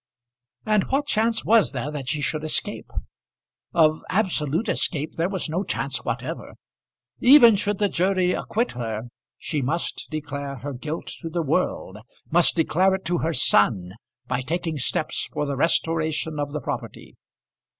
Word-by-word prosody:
And 215 -3 +2
what 280 +2 0
chance 225 -3 +1
was 225 -5 +4
there 135 +3 -3
that 140 -4 -5
she 150 -1 -1
should 155 +1 -1
escape? 155 - -2 0.8
Of 155 -2 +3
absolute 185 - +1
escape 155 -6 0
there 170 +2 0
was 190 -3 -2
no 170 +5 -1
chance 140 -7 -2
whatever. 130 +8 -5 0.6
Even 245 -4 +8
should 205 0 0
the 205 - +2
jury 185 0 +1
acquit 230 +6 -1
her, 115 -3 -4 0.3
she 150 - -3
must 160 +7 -2
declare 145 -2 -5
her 140 +3 -6
guilt 150 +6 -5
to 165 - -6
the 170 +1 -1
world, 140 - -1 0.3
must 170 +1 +4
declare 185 +3 +3
it 190 - -8
to 175 +1 0
her 165 - 0
son, 105 - +3 0.4
by 125 +1 -1
taking 160 +2 -3
steps - - -1
for 150 - -2
the 140 -1 -2
restoration 160 0 +1
of 145 0 -2
the 150 0 -4
property. - - -6
160 Hz, 155 wpm, -24 LUFS, 140-185 Hz, 0.8 s, Even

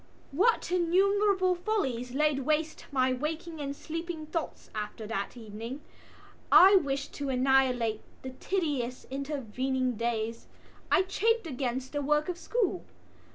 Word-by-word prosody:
What 390 - +2
innumerable 375 +2 +3
follies 265 - -2
laid 300 -1 +2
waste 310 +3 -1
my 260 -2 +2
waking 315 +4 -4
and 280 0 -3
sleeping 330 +1 -5
thoughts 320 +1 -5
after 215 +1 -5
that 210 +1 -4
evening! 230 +5 -7 0.7
I 390 +2 +9
wished 280 -6 0
to 280 -1 -4
annihilate 255 -4 +2 0.2
the 260 - -5
tedious 270 -5 -2
intervening 260 -2 -2
days. 230 0 -2 0.4
I 370 - +5
chafed 445 +3 +1
against 260 -3 -3
the 290 - -1
work 300 +3 +1
of 350 -1 -3
school. 400 -4 -1
280 Hz, 125 wpm, -29 LUFS, 250-345 Hz, 0.7 s, I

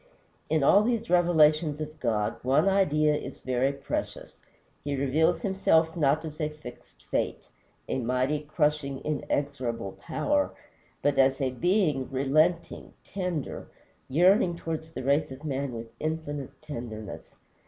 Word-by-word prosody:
In 155 -1 +2
all 200 +8 +6
these 230 -4 -1
revelations 155 -3 +4
of 155 0 -6
God, 110 -5 0
one 140 +8 +3
idea 155 -6 +3
is 150 - -5
very 130 +1 +1
precious. 140 -1 -5 0.5
He 145 -1 -2
reveals 140 - +1
himself 165 -5 +2
not 150 -1 +2
as 155 +1 -7
a 150 - 0
fixed 150 -5 -13
Fate - - -1 0.4
a - - -1
mighty, 130 +4 0
crushing, 150 -2 -1
inexorable 140 -8 -2
Power 290 0 0 0.5
but 145 -1 +2
as 135 +1 +4
a 135 -2 0
Being 155 - +1
relenting, 155 +6 +1
tender, 180 -6 -4 0.4
yearning 175 - +4
towards 160 -1 -5
the 160 - -7
race 140 +2 +1
of 135 +4 -9
man 140 -2 -2
with 115 -1 -8
infinite 155 -3 -4
tenderness. 115 -7 -7
150 Hz, 130 wpm, -28 LUFS, 135-160 Hz, 0.5 s, all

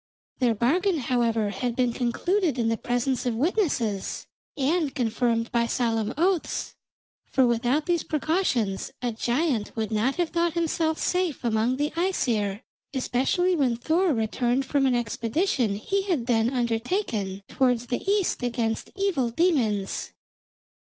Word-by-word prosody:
Their 240 -4 +2
bargain, 335 - +2
however, 230 -5 +1
had 245 +1 -2
been 250 -2 +1
concluded 310 - 0
in 230 -2 +1
the 225 - +1
presence 245 +2 -1
of 235 - 0
witnesses, 255 - 0 0.3
and 295 +1 +1
confirmed 230 -2 0
by 235 -1 +2
solemn 225 -3 0
oaths, 355 +1 0 0.5
for 265 - +3
without 245 +5 +1
these 345 -2 +1
precautions 295 - 0
a 245 - 0
giant 240 0 -1
would 220 -1 -2
not 220 +5 +1
have 350 -2 0
thought 340 -1 0
himself 325 -1 0
safe 360 -8 -1
among 230 +2 +1
the 295 +1 0
Æsir, 235 - 0 0.3
especially 270 +8 +1
when 265 -7 +2
Thor 330 +8 +2
returned 240 +2 0
from 270 0 +2
an 255 - +2
expedition 235 - 0
he 390 - -1
had 350 -11 -1
then 230 -2 +2
undertaken 230 - -1
towards 250 -3 +1
the 245 0 -2
east 400 -7 +1
against 235 -2 -1
evil 385 -12 0
demons. 230 - 0
250 Hz, 140 wpm, -26 LUFS, 230-320 Hz, 0.5 s, for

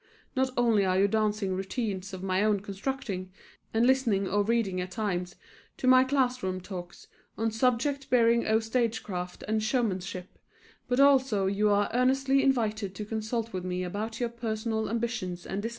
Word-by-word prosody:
Not 265 0 +2
only 230 -4 +3
are 185 -1 +1
you 195 +1 +4
dancing 210 -2 0
routines 195 0 -3
of 190 -1 -7
my 190 +1 +1
own 210 -2 +2
constructing, 200 -2 -4 0.4
and 225 +2 +2
listening 240 -7 +2
or 205 +2 +1
reading 205 -4 0
at 180 - -5
times 180 -3 -3 0.4
to - - -4
my 255 0 +7
class 260 -2 +1
room 185 -2 -2
talks 180 -2 -8 0.3
on 225 0 0
subjects 255 +4 0
bearing 235 -1 +3
oh 220 0 +4
stage 230 0 -1
craft 180 -3 -5
and 215 0 +1
showmanship, 195 -6 -2 0.5
but 250 +1 0
also 265 -8 +4
you 200 +2 +2
are 205 0 +3
earnestly 270 +2 +3
invited 220 -7 0
to 210 - -5
consult 220 +1 -3
with 185 -1 -3
me 180 0 -2
about 215 +5 -4
your 240 -1 0
personal 220 -1 -2
ambitions 220 -6 -3
and 195 +2 -3
desires. 225 - -2
220 Hz, 170 wpm, -28 LUFS, 190-240 Hz, 0.5 s, my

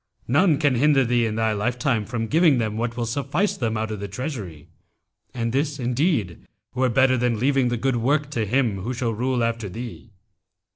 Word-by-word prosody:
None 155 +4 +3
can 145 -3 +2
hinder 135 +1 +3
thee 120 -1 +2
in 110 - -3
thy 110 0 +1
lifetime 120 +1 0
from 115 -1 -2
giving 155 +2 +4
them 110 -3 -1
what 115 +1 -3
will 120 - -1
suffice 140 - -1
them 115 -3 -2
out 110 0 -2
of 105 - -4
the 100 - -5
treasury; 100 - -6 0.6
and 115 -2 -2
this 145 +1 0
indeed 125 - -1 0.3
were 130 0 +1
better 130 +2 +3
than 120 -2 0
leaving 135 +2 +2
the 120 0 -1
good 130 +1 0
work 145 +5 0
to 115 -6 -1
him 115 -3 +1
who 125 +6 -3
shall 120 -1 -1
rule 125 +2 0
after 115 -3 -2
thee.' 115 +3 -8
120 Hz, 195 wpm, -23 LUFS, 115-135 Hz, 0.6 s, giving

